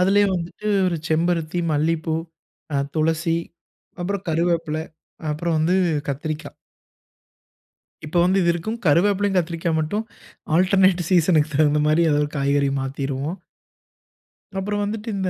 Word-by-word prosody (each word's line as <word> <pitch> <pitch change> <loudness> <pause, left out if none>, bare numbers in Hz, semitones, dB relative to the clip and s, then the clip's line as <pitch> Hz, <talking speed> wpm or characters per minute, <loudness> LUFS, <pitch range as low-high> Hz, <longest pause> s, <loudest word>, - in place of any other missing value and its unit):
அதுலேயே 200 +2 +4
வந்துட்டு 175 +4 -5 0.2
ஒரு 175 -2 0
செம்பருத்தி, 165 +1 0
மல்லிப்பூ, 160 +1 0 0.6
அ - - +2 0.2
துளசி, 165 +1 +1 0.6
அப்புறம் 195 +1 -3
கருவேப்பில, 165 -1 0 0.5
அப்புறம் 160 +2 -1
வந்து 165 +4 +2 0.3
கத்திரிக்கா. 150 +2 -4 1.6
இப்போ 160 +3 -2
வந்து 185 +2 +3
இது 170 - +2
இருக்கும். 215 +7 -4
கருவேப்பிலையும், 195 +5 +3
கத்திரிக்காய் 165 -1 0
மட்டும் 205 +8 -1 0.5
ஆல்டர்னேட் 185 -1 +3
சீசன்க்கு 160 -4 +3
தகுந்த 150 0 +3
மாரி 155 +2 +3
ஏதாவது 145 0 +2
காய்கறி 140 0 +2
மாத்திருவோம். 135 +4 -3 1.2
அப்புறம் 205 +2 -1
வந்துட்டு 210 +2 -4
இந்த 190 -1 -1
165 Hz, 115 wpm, -22 LUFS, 155-185 Hz, 1.6 s, அதுலேயே